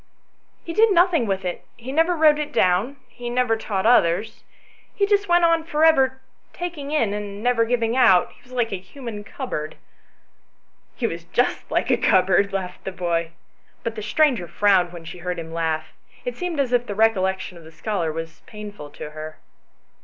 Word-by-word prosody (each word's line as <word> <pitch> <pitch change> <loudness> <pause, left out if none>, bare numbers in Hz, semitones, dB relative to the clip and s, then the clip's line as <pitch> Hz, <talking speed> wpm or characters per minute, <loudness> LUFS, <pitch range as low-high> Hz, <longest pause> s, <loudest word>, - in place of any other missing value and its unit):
" - - -42
He 335 - -4
did 440 +4 +5
nothing 345 - +3
with 195 -1 -2
it, 180 - -4
he 240 +3 -7
never 325 +5 +2
wrote 305 -2 +5
it 300 0 -3
down, 190 +5 +2
he 240 -1 -7
never 245 -2 +1
taught 205 -3 -3
others; 220 -1 +3 0.5
he 400 - +2
just 405 -1 +1
went 345 0 +5
on 330 -1 +3
for 315 -1 +2
ever 265 -4 +4 0.3
taking 335 -5 -5
in 260 -9 +1
and 205 0 -5
never 245 -2 +3
giving 230 0 0
out; 190 -9 +5
he - - -22
was 250 - -21
like 240 -3 0
a 190 - -2
human 210 +2 -8
cupboard 180 - -5 0.4
" - - -42
" - - -42
He - - -2
was - - -3
just - - 0
like - - 0
a - - +4
cupboard," 190 +1 +3
laughed 185 -2 -4
the 190 - -4
boy. 170 -2 -1 0.5
But 230 - -2
the 220 - -6
stranger 230 - +2
frowned 190 -2 +3
when 170 -2 -10
she 170 +2 -9
heard 180 0 -3
his 165 -1 -7
laugh; 160 -1 -2 0.3
it - - -3
seemed 355 -4 -3
as 255 -3 0
if 245 0 +2
the 205 - -4
recollection 190 -4 +1
of - - -15
the 160 - -13
scholar 165 0 -2
was 165 +1 -7
painful 210 -8 -9
to 150 +1 -9
her. 155 0 -8
215 Hz, 200 wpm, -23 LUFS, 180-275 Hz, 0.5 s, did